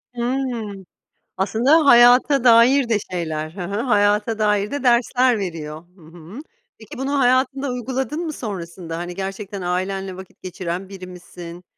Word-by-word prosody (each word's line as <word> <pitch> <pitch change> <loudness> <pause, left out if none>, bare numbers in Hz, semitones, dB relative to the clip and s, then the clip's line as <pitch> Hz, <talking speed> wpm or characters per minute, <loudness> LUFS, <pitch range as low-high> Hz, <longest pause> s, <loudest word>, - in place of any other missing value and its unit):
Hıı. 235 -6 -3 0.5
Aslında 255 +11 +3
hayata 245 +2 +6
dair 240 +2 +5
de 220 - +3
şeyler 155 -3 -3
Hı 185 - -8
hı. 200 +5 -3
hayata 210 -1 +1
dair 210 0 +1
de 285 -1 -4
dersler 245 -1 +3
veriyor. 160 -4 -6
Hı 180 - -21
hı. 165 - -12 0.4
Peki 220 -2 -12
bunu 275 +2 -1
hayatında 260 +2 +1
uyguladın 260 +4 -3
mı 310 - -4
sonrasında? 175 -7 -6
Hani 175 +1 -6
gerçekten 195 +1 -6
ailenle 185 +1 -3
vakit 190 -1 -13
geçiren 185 +1 -5
biri 190 -2 -9
misin? 180 -1 -11
205 Hz, 145 wpm, -21 LUFS, 180-245 Hz, 0.5 s, hayata